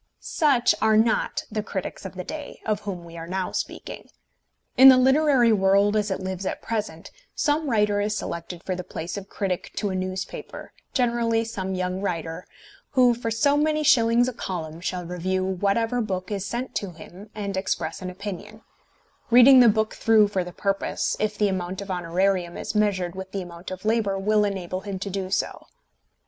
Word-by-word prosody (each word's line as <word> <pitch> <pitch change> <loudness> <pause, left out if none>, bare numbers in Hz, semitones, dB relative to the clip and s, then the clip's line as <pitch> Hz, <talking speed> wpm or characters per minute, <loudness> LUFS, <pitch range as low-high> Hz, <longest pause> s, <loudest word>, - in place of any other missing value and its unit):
Such 275 -6 +2
are 220 0 +4
not 225 +1 +1
the 215 0 -1
critics 195 -1 -5
of 190 - -7
the 180 - -5
day, 300 - -7
of 215 -2 0
whom 185 -5 -6
we 170 0 -11
are 165 0 -7
now 185 +1 -2
speaking. - - -5 0.7
In 265 +1 +10
the 260 - +8
literary 265 -2 +4
world 200 +1 +3
as 210 -1 +1
it 190 - -2
lives 190 0 -4
at - - -3
present 210 -8 -4 0.2
some 300 0 +1
writer 210 -3 +2
is 210 +1 -1
selected 170 +1 -6
for 185 - -2
the 180 - -5
place 170 0 -6
of 200 -1 -7
critic 190 -3 -3
to 205 -3 -1
a - - -3
newspaper, 185 0 -5 0.2
generally 235 -2 +1
some 190 -4 -4
young 185 +1 -2
writer, 165 -3 -4 0.5
who 250 -3 +5
for 235 -1 -4
so 255 +6 +2
many 305 +1 +1
shillings 240 -4 +4
a 255 - -3
column 165 -7 -5
shall 180 -1 -3
review 185 +2 -2
whatever 205 +6 0
book 190 -3 -3
is 200 -2 -2
sent 245 +2 -4
to 195 -3 -5
him 180 +5 -12
and 200 -2 -4
express 180 -4 -2
an 185 - -4
opinion, 205 +3 -8 0.7
reading 250 +2 +8
the 240 -2 +8
book 220 +1 +1
through 220 -2 +4
for 190 -3 -1
the 180 - -8
purpose, 195 +2 -1
if 210 -1 -1
the 210 - +3
amount 185 -1 -3
of 200 -1 -6
honorarium 180 0 0
as - - -4
measured 195 -5 +1
with 190 0 -8
the 195 -2 -2
amount 170 0 -10
of 185 +2 -8
labour 215 -3 +1
will 210 +2 +2
enable 185 -2 -3
him 200 -1 -5
to 200 +1 -5
do 190 -1 -3
so. 190 - -2
200 Hz, 190 wpm, -24 LUFS, 185-225 Hz, 0.7 s, In